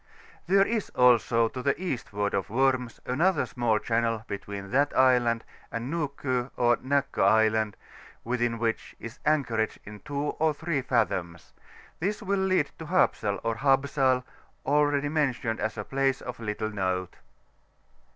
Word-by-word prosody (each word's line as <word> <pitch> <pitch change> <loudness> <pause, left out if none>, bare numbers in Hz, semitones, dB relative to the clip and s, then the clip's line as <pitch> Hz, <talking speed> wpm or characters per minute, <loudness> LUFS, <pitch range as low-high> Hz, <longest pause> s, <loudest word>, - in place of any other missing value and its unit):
There 195 +2 +5
is 220 -2 -2
also, 120 -2 +4
to 130 - -6
the 140 +4 0
eastward 115 - -3
of 100 +1 -1
Worms, 130 0 +1
another 160 +6 +2
small 120 -3 0
channel 115 0 0
between 100 0 -6
that 140 +3 +2
island 125 -3 +4 0.3
and 120 +6 -4
Nuko 140 -5 -2
or 120 -1 +3
Nakko 140 +1 -1
Island, 110 0 +3 0.5
within 120 -1 -1
which 115 -1 -2
is 115 0 -9
anchorage 120 -8 +1
in 105 0 -10
2 145 +2 -5 0.2
or 155 -1 +2
3 160 -2 -1
fathoms; 95 -10 -1 0.5
this 205 +5 -2
will 200 0 0
lead 185 -6 +1
to 160 - -7
Hapsal 110 - +1
or 115 0 -1
Habsal, 135 -1 +2 0.4
already 145 0 +2
mentioned 130 -7 -1
as 110 0 -2
a 105 - -3
place 135 +2 0
of 125 -1 -7
little 110 -1 -3
note. 95 -3 -2
125 Hz, 140 wpm, -27 LUFS, 110-145 Hz, 0.5 s, There